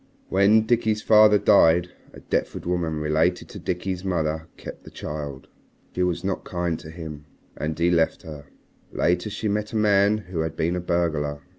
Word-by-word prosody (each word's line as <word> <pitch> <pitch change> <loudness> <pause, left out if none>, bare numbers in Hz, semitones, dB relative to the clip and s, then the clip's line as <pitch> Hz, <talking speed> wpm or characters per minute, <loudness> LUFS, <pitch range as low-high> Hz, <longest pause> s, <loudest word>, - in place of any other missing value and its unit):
"When 105 +3 +4
Dickie's 110 -2 +1
father 105 -1 +6
died, 90 -4 +4 0.2
a - - -13
Deptford - - -2
woman 85 -2 -1
related 75 +1 0
to - - -9
Dickie's 90 0 -3
mother 80 -3 -2
kept - - -10
the - - -11
child. 75 -3 -7 0.5
She 90 - -2
was 90 -1 0
not 95 0 -2
kind 85 -2 -2
to 80 - -11
him. 80 -3 -8 0.3
And 75 +1 -4
he 85 +1 +2
left 80 -2 +1
her. 75 -3 -10 0.4
Later 90 +4 0
she 110 +1 -4
met 105 +2 -2
a - - -4
man 105 -1 +3
who 90 -5 -6
had 80 0 -2
been 85 +3 0
a 90 - -2
burglar. 80 -5 -1
85 Hz, 175 wpm, -24 LUFS, 80-100 Hz, 0.5 s, father